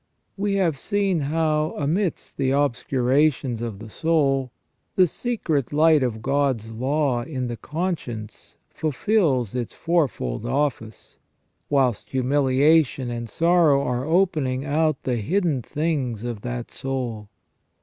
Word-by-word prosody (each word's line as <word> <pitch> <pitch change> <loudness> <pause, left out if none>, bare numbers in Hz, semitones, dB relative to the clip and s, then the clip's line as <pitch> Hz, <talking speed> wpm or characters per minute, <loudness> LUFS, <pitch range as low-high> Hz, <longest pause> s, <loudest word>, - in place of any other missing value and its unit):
We 200 0 -1
have 170 -8 +1
seen 200 -2 0
how, 155 +1 0
amidst 165 +5 -1
the 135 -1 +1
obscurations 130 -1 +1
of 115 -4 -4
the 110 +1 -10
soul, 135 -5 +1 0.4
the 185 - +6
secret 165 - -2
light 155 0 +5
of 115 -4 -2
God's 135 -5 0
law 130 +2 0
in 130 0 -4
the 120 -1 -3
con 170 - -2
science 110 -3 -9
fulfils 150 - +1
its 125 -2 -4
fourfold 140 - -1
office, 120 -4 -3 0.5
whilst 130 -6 +1
humiliation 135 +1 +2
and 120 -1 -5
sorrow 165 -4 +3
are 125 -1 -1
opening 155 -6 +1
out 155 0 +1
the 125 -2 0
hidden 155 - 0
things 135 -6 -2
of 120 -4 -4
that 120 0 -5
soul. 125 -6 -4
140 Hz, 125 wpm, -23 LUFS, 120-160 Hz, 0.5 s, the